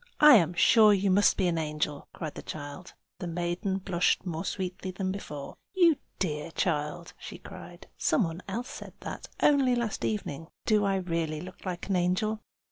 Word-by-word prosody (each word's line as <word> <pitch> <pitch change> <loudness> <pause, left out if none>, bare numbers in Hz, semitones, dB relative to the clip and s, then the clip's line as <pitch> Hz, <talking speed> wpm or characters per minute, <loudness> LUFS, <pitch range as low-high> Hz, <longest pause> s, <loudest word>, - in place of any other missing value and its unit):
"I 300 0 +9
am 175 -2 +1
sure 215 +3 +6
you 195 0 +1
must 205 +2 +4
be 190 - +2
an 170 -2 +1
angel!" 150 -2 -2
cried 155 -3 -6
the - - -7
child. 145 +4 -8 0.2
The 180 - -4
maiden 175 +3 -1
blushed 185 -1 +1
more 165 -1 -3
sweetly 185 -1 -4
than 185 0 -2
before. 150 -8 -7 0.2
"You 340 -5 +5 0.2
dear 150 -5 -1
little 165 - -9
child!" 155 0 -1
she - - -8
cried. - - -11
"Some 240 - +3
one 165 0 -4
else 235 +6 -4
said - - -9
that, - - -6 0.2
only 275 -4 +5
last 235 -3 -2
evening. 165 -7 -3 0.2
Do 210 -2 +3
I 195 -1 +2
really 165 -4 -1
look 180 +3 -9
like 180 -1 -4
an 195 - +1
angel?" 185 +5 +1
180 Hz, 185 wpm, -29 LUFS, 165-200 Hz, 0.2 s, I